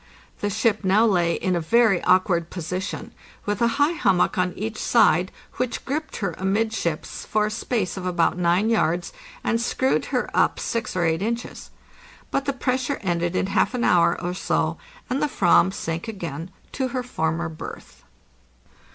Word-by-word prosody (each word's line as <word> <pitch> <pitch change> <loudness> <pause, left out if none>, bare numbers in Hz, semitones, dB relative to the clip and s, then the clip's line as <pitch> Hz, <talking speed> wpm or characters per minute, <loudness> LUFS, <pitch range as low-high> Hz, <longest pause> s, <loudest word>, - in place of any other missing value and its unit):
The 205 - -1
ship 210 +1 +1
now 195 +4 +4
lay 175 -6 +2
in 185 -1 0
a 170 - 0
very 220 +2 +3
awkward 180 -2 +3
position, 180 +3 -5 0.3
with 205 +1 -2
a 235 - +5
high 290 +2 +4
hummock 195 - +2
on 180 -1 +1
each 215 +2 -5
side, 190 -6 +3 0.3
which 250 -1 -2
gripped 305 +3 -3
her 180 - -2
amidships 195 -4 -1
for 215 0 +1
a 215 - -2
space 215 -4 -2
of 185 -1 -4
about 170 -2 +2
9 180 +5 +2
yards, 175 -5 +1 0.3
and 230 0 +1
screwed 260 +2 +1
her - - -1
up - - +2
6 230 -2 -3
or 175 -2 +1
8 165 +1 +1
inches. 235 +3 -4 0.6
But 275 - 0
the 280 - +1
pressure 260 +1 -1
ended 175 -2 -1
in - - +1
half 200 +5 +1
an 245 - -1
hour 170 -4 +4
or 175 +1 -3
so, 185 - -1 0.3
and 260 +3 -1
the 300 - +2
/vam 190 -6 +4
sank 165 0 -4
again 170 -6 -5 0.2
into 265 -2 -3
her 255 -1 -1
former 165 -7 -1
berth. 160 -1 -9
195 Hz, 170 wpm, -24 LUFS, 175-230 Hz, 0.6 s, a